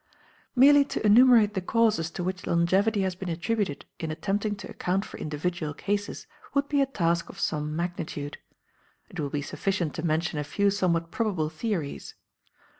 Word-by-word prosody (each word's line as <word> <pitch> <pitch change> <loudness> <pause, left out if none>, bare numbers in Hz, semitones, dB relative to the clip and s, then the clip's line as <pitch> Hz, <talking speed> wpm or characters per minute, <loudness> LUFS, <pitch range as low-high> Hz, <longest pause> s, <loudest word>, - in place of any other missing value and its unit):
Merely 285 +3 +7
to 245 - -3
enumerate 225 -1 +6
the 190 - -1
causes 215 -4 +2
to 175 - -5
which 185 +1 -4
longevity 190 +5 +2
has 190 -1 0
been 185 0 -6
attributed 180 -1 -2
in 160 - -3
attempting 205 +6 -1
to 200 - -9
account 190 +3 -1
for - - -10
individual 155 0 -3
cases 205 +3 -3 0.3
would 280 0 +2
be 285 -1 +2
a 275 - +2
task 170 -9 0
of 195 - -11
some 150 -5 -1
magnitude; 160 -4 -4 0.7
it 180 -5 -8
will 145 -2 -1
be 145 0 -2
sufficient 180 -2 -2
to 160 - -5
mention 160 -1 0
a - - -1
few 200 +7 +1
somewhat 170 -4 0
probable 185 -9 -1
theories. 160 -3 -4
185 Hz, 170 wpm, -27 LUFS, 160-210 Hz, 0.7 s, Merely